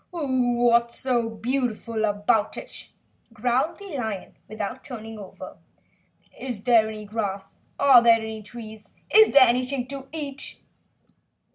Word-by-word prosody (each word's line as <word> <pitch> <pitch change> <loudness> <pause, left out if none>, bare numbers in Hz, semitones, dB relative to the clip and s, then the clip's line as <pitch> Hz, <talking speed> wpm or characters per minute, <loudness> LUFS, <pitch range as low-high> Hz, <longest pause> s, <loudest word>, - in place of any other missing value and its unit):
"What's 245 -6 +1
so 240 -3 0
beautiful 230 -1 -2
about 205 +1 +1
it?" - - -6 0.4
growled 250 +9 0
the 395 -6 -8
lion 220 -6 -5
without 215 +4 -5
turning 225 -3 -8
over. 195 -2 -10 0.8
"Is 240 -6 -5
there 230 -3 +4
any 215 -1 -7
grass? 200 -2 -4 0.2
Are 265 -4 +7
there 230 -1 +5
any 220 -1 -6
trees? 220 0 -11 0.2
Is 440 0 +7
there 275 -2 +8
anything 250 +2 0
to 275 -1 -7
eat?" 290 -3 -4
235 Hz, 125 wpm, -24 LUFS, 220-260 Hz, 0.8 s, there